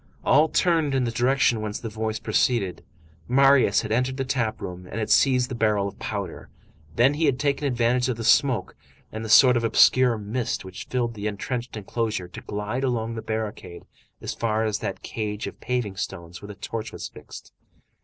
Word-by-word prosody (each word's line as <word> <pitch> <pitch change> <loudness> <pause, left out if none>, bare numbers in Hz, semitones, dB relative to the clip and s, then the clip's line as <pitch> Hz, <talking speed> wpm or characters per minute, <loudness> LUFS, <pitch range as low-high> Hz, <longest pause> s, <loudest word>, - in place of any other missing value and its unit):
All 155 +2 +5
turned 160 -6 +2
in 130 - +2
the 120 - -1
direction 120 -1 +2
whence 105 0 -3
the 115 - -6
voice 110 0 -3
proceeded. 110 -4 0 0.4
Marius 135 -3 +4
had - - -5
entered 125 +3 0
the 135 - -2
tap 125 -4 -1
room, 90 0 -7
and - - -7
had 110 -1 -2
seized 125 -2 +4
the 130 - -6
barrel 105 -4 +1
of 100 - -9
powder, - - -5 0.5
then 125 +4 +4
he 155 +2 0
had 140 -4 +2
taken 145 0 0
advantage 125 0 +1
of 120 - -2
the 115 - -5
smoke, 130 +1 +2 0.4
and 110 +1 -6
the 110 - -5
sort 125 +3 +7
of 120 - 0
obscure 125 +1 +4
mist 110 +1 -3
which 95 - -9
filled 120 -2 -1
the 105 -1 -4
entrenched 120 +3 -4
enclosure, 105 -2 -3
to 90 - -10
glide 105 +5 -4
along 115 -3 -1
the 115 - -5
barricade 105 -6 -5 0.4
as - - -4
far 110 -1 0
as 105 -1 -1
that - - -5
cage 105 -2 -4
of - - -8
paving 125 -6 -2
stones 85 -2 -6
where 100 - -9
the 105 - -9
torch 110 +2 -5
was - - -6
fixed. - - -12
115 Hz, 195 wpm, -24 LUFS, 105-125 Hz, 0.5 s, sort